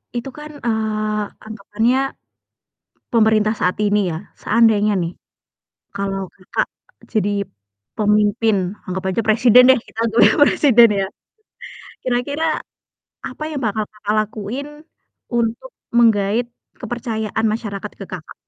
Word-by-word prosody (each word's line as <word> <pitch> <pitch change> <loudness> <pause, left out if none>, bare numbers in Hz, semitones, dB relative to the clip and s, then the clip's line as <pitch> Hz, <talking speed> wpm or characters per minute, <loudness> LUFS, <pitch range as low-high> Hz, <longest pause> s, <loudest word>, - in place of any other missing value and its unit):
itu 240 +2 -3
kan, 300 0 -9
eee, 215 -2 -1 0.2
anggapannya 220 +3 -1 1.2
pemerintah 220 -1 +3
saat 180 - +1
ini 205 -3 +1
ya, 160 - -3 0.3
seandainya 215 -2 +3
nih, 170 - -3 0.8
kalau 195 -1 -3
Kakak 185 - -2 0.5
jadi 205 -2 +1 0.7
pemimpin, 210 +1 +2 0.3
anggap 185 +1 -4
aja 190 +5 0
presiden 235 +3 +6
deh, 260 - +7
kita - - -19
anggap 230 +1 0
aja - - +4
presiden 240 -6 +6
ya, 195 - 0 1.0
kira-kira 255 +6 -1 0.8
apa - - -8
yang 285 -3 -4
bakal 215 0 0
Kakak 210 0 -3
lakuin 215 +6 -4 0.6
untuk 235 - -1 0.2
menggaet 225 0 +3 0.3
kepercayaan 225 -2 -3
masyarakat 210 -2 -4
ke 195 - -6
Kakak? 175 -4 -8
220 Hz, 115 wpm, -20 LUFS, 205-235 Hz, 1.2 s, deh